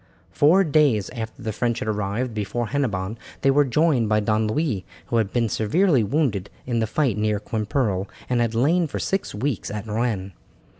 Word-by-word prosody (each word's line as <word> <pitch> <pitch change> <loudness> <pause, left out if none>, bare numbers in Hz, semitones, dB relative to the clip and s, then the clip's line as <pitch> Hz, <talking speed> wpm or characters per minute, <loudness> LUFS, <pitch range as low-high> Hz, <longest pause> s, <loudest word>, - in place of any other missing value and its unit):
Four 170 +7 +5
days 145 - +2
after 110 -2 -6
the 110 - -2
French 120 +1 0
had 130 - -4
arrived 105 +3 -2
before 110 +2 -2
Hennebon 110 -6 -2 0.2
they 135 - +4
were 145 +2 +5
joined 135 -4 +2
by 105 0 +3
Don 110 +1 +1
Louis, 110 - -1 0.2
who 120 - -1
had 110 -3 +1
been 120 -2 +1
severely 130 - +2
wounded 105 - 0 0.2
in 120 -2 0
the 110 - 0
fight 125 -3 0
near 105 -1 +1
Quimperle, 105 -3 -1 0.2
and 125 -1 +1
had 115 -1 0
lain 160 +8 +3
for - - -5
six 195 - -2
weeks 130 +2 -2
at 105 +1 -5
Rennes. 110 -3 -2
115 Hz, 185 wpm, -23 LUFS, 105-140 Hz, 0.2 s, Four